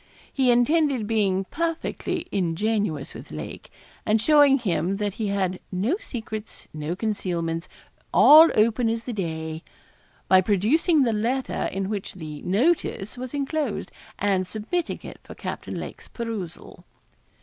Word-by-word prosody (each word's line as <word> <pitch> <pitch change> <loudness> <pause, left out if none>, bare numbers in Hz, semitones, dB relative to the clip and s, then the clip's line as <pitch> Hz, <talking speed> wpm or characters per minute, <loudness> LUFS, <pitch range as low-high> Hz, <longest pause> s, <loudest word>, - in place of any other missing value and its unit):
He 265 -3 +2
intended 265 0 +3
being 200 -3 +1
perfectly 335 0 -2
ingenuous 185 -3 -1
with - - -10
Lake, 75 -1 -8 0.3
and 215 +1 +2
showing 290 +2 +6
him 190 - -1
that 205 -1 -2
he 215 - 0
had 190 -2 -1
'no 205 - 0
secrets 220 - -7
no 155 +3 -3
concealments 175 -5 -2 0.4
all 315 +2 +9
open 225 +2 +3
as 225 0 -2
the 245 - -5
day' 160 -4 -4 0.7
by 185 0 +6
producing 250 - +3
the 230 -3 +1
letter 240 +5 -1
in 195 0 -2
which 200 -2 -4
the 155 -4 -7
'notice' 215 - 0
was 255 +2 -6
enclosed, 290 +2 -2 0.3
and 190 -2 +1
submitting 235 - -3
it - - -9
for - - -11
Captain - - -5
Lake's - - -8
perusal. 220 -8 -6
215 Hz, 135 wpm, -25 LUFS, 185-255 Hz, 0.7 s, all